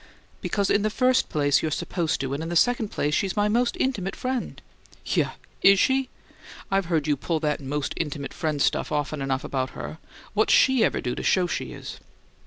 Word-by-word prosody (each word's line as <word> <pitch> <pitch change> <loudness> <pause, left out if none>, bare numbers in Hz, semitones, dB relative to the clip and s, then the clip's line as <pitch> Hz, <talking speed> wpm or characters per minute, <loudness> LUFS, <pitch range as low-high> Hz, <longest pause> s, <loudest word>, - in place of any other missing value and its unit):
"Because, 200 -2 0
in 205 - +3
the 215 - +1
first 255 +3 +2
place, 145 -2 +2
you're 160 - -1
supposed 160 +1 -1
to, 135 0 -2
and, 140 - -3
in 165 - -4
the 175 - -3
second 240 - +3
place, 150 -6 -1
she's 190 +2 0
my 205 0 +2
most 235 +3 +1
intimate 200 -8 -1
friend." 255 -1 -3 0.5
"Yeuh? - - +1 0.3
Is 195 0 +7
she? 265 +2 +2 0.6
I've 195 -1 +2
heard 165 -4 0
you 150 -2 +2
pull 160 +4 -2
that 150 -2 0
'most 140 +1 -2
intimate 150 -3 -4
friend' 155 -4 -1
stuff - - 0
often 150 0 -2
enough 135 -1 -1
about 130 -1 -2
her. 160 - -6 0.3
What's 215 +1 +3
SHE 260 -3 +5
ever - - +1
do 125 - -2
to - - -5
show 185 -1 +3
she 175 - -3
is?" - - -8
170 Hz, 200 wpm, -25 LUFS, 145-215 Hz, 0.6 s, Is